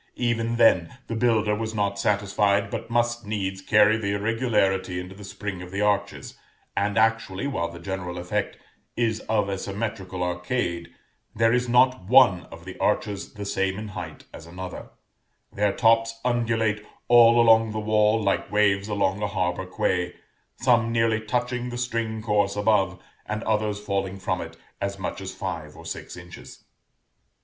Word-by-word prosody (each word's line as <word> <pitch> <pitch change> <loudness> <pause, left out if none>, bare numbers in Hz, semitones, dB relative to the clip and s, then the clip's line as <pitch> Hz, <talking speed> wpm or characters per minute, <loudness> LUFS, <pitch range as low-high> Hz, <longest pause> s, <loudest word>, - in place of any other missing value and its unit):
Even 115 -1 0
then, 115 -2 +3
the 115 - -4
builder 110 -2 +2
was 110 +1 -3
not 100 -1 -1
satisfied, 100 0 +1
but - - -5
must 120 0 0
needs 95 -2 -3
carry 105 +2 +4
the 100 -2 -1
irregularity 100 -4 0
into 90 +1 -8
the 100 +1 -12
spring 95 -1 -6
of 90 - -8
the 100 +2 -3
arches, 100 -1 -1 0.4
and 100 0 0
actually, 115 -1 +1
while 85 -12 -2
the 85 - -10
general 90 0 -5
effect 90 0 -2 0.4
is 115 -2 +1
of 105 -2 +2
a 100 -1 -3
symmetrical 100 -3 -4
arcade, 90 -1 -2 0.5
there 115 +1 +3
is 125 0 +1
not 125 -2 +4
one 115 -5 +5
of 85 +1 -12
the 95 - -9
arches 105 -1 -1
the 105 -1 -6
same 95 -1 -1
in 105 0 -6
height 105 - -7
as 80 - -10
another; 90 +2 -8 0.6
their 105 0 +1
tops 115 +1 +2
undulate 115 -3 0 0.2
all 120 0 +7
along 115 -1 +5
the 110 - -3
wall 105 +1 +3
like 100 -2 -1
waves 100 -1 +2
along 100 -1 0
a 105 - 0
harbor 95 -2 -2
quay, 90 -1 -1 0.4
some 120 -2 +2
nearly 115 -1 +2
touching 125 +2 -2
the 120 - -5
string 115 -3 -2
course 105 -2 +1
above, 105 -3 +2 0.3
and 105 +1 -3
others 105 -1 0
falling 100 -2 -2
from 95 -1 -2
it 80 0 -9 0.2
as 100 0 -2
much 95 - -5
as - - -5
five - - -5
or - - -12
six - - -7
inches. 85 0 -12
105 Hz, 165 wpm, -25 LUFS, 95-115 Hz, 0.6 s, all